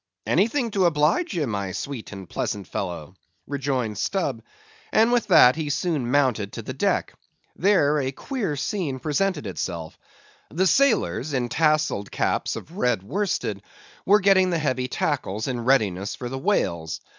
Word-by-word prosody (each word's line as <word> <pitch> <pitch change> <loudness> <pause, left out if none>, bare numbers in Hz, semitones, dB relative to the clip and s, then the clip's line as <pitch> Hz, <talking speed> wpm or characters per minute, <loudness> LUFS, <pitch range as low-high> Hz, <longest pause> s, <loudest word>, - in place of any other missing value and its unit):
"Anything 225 - +1
to 190 -3 +3
oblige 165 - +1
ye, 160 -4 0
my 100 -5 -3
sweet 140 -1 -5
and 95 -3 -8
pleasant 100 +2 -3
fellow," 90 -3 -5 0.3
rejoined 130 -7 -2
Stubb, 190 - -1 0.5
and 225 +2 +4
with 245 -2 +2
that 125 +1 +7
he 155 -2 -3
soon 145 -5 -1
mounted 125 -7 +1
to - - -6
the - - -5
deck. - - 0 0.4
There 150 -6 +3
a 135 -1 -1
queer 205 - -3
scene 145 -1 -2
presented 155 - -1
itself. 85 -4 -5 0.5
The 185 +5 0
sailors, 185 - +2
in 125 -2 0
tasselled 155 -9 +1
caps - - -1
of 170 +5 -9
red 120 -6 +1
worsted, 140 - -2 0.4
were 205 +2 +4
getting 190 -1 +5
the 170 - +1
heavy 130 -5 -1
tackles 115 -6 -2
in 120 -3 -3
readiness 105 -7 +1
for 125 - -6
the 135 +1 -4
whales. 85 - -1
140 Hz, 155 wpm, -24 LUFS, -, 0.5 s, that